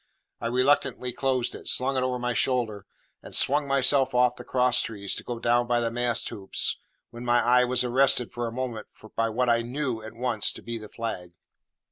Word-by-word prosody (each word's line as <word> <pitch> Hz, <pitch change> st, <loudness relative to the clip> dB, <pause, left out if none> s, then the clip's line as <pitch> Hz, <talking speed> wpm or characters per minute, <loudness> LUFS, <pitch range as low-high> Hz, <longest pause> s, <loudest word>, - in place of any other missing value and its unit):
I 115 Hz, -, -3 dB
reluctantly 125 Hz, 0 st, +1 dB
closed 130 Hz, -2 st, 0 dB
it, -, -, -10 dB
slung 135 Hz, +2 st, +1 dB
it 130 Hz, -, +1 dB
over 130 Hz, 0 st, -1 dB
my 125 Hz, 0 st, -2 dB
shoulder, 115 Hz, -5 st, -1 dB, 0.3 s
and -, -, -9 dB
swung 145 Hz, +1 st, +3 dB
myself 135 Hz, -1 st, +3 dB
off 125 Hz, 0 st, +3 dB
the 125 Hz, -, -10 dB
cross 125 Hz, 0 st, +2 dB
trees 100 Hz, -3 st, -3 dB
to -, -, -4 dB
go 120 Hz, -, -5 dB
down 120 Hz, +1 st, +2 dB
by 120 Hz, 0 st, +2 dB
the 115 Hz, -1 st, -1 dB
mast 120 Hz, -1 st, 0 dB
hoops, 95 Hz, -2 st, -1 dB, 0.3 s
when 120 Hz, +1 st, -9 dB
my 120 Hz, 0 st, +3 dB
eye 125 Hz, +1 st, +4 dB
was 125 Hz, 0 st, +1 dB
arrested 125 Hz, -1 st, +2 dB
for 120 Hz, -1 st, -3 dB
a -, -, -5 dB
moment 120 Hz, -2 st, -4 dB, 0.3 s
by 115 Hz, 0 st, +1 dB
what 125 Hz, +3 st, 0 dB
I 115 Hz, 0 st, +3 dB
knew 125 Hz, -1 st, -3 dB
at 110 Hz, +1 st, -10 dB
once 120 Hz, -3 st, 0 dB
to -, -, -11 dB
be 115 Hz, -1 st, -5 dB
the 105 Hz, -1 st, -10 dB
flag. 90 Hz, -7 st, -5 dB
120 Hz, 205 wpm, -26 LUFS, 115-125 Hz, 0.3 s, eye